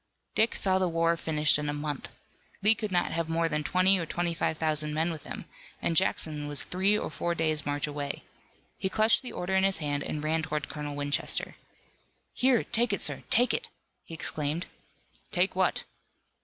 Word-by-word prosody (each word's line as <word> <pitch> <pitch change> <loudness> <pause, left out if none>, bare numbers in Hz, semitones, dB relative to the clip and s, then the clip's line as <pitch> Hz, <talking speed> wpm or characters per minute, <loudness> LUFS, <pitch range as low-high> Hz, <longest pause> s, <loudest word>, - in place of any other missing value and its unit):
Dick 220 +1 +2
saw 190 -1 +3
the 185 -1 +1
war 165 0 +2
finished 155 -2 +2
in 150 0 -2
a - - -1
month. 145 -1 -4 0.5
Lee 215 +2 +7
could 215 -2 -4
not 175 -1 +1
have 165 0 -2
more 165 0 +1
than 150 -1 -1
twenty 185 +3 +3
or 170 - -2
twenty 175 +1 -1
five 160 -1 -1
thousand 155 -1 +1
men 160 +2 +1
with 155 -3 -7
him, - - -7 0.3
and 165 - -1
Jackson 155 -5 +1
was 145 -1 -3
three 195 +3 +2
or - - -4
four 170 +3 -2
days' 155 -3 0
march 145 -1 0
away. 145 -1 -4 0.6
He 190 - -1
clutched 220 +3 +4
the 255 - -7
order 180 +2 -3
in 190 - +3
his 195 -2 +4
hand 145 -2 -2
and 150 - -4
ran 160 +1 +1
toward 150 -2 -3
Colonel 145 0 -5
Winchester. 145 0 0 0.8
"Here, 255 -2 +3
take 240 0 +1
it, - - -2
sir! - - -1
Take 245 0 +4
it!" 470 -1 -2 0.3
he 165 - -9
exclaimed. 155 +2 -1 0.6
"Take 180 +2 +1
what?" 185 -1 +1
165 Hz, 195 wpm, -29 LUFS, 150-190 Hz, 0.8 s, Lee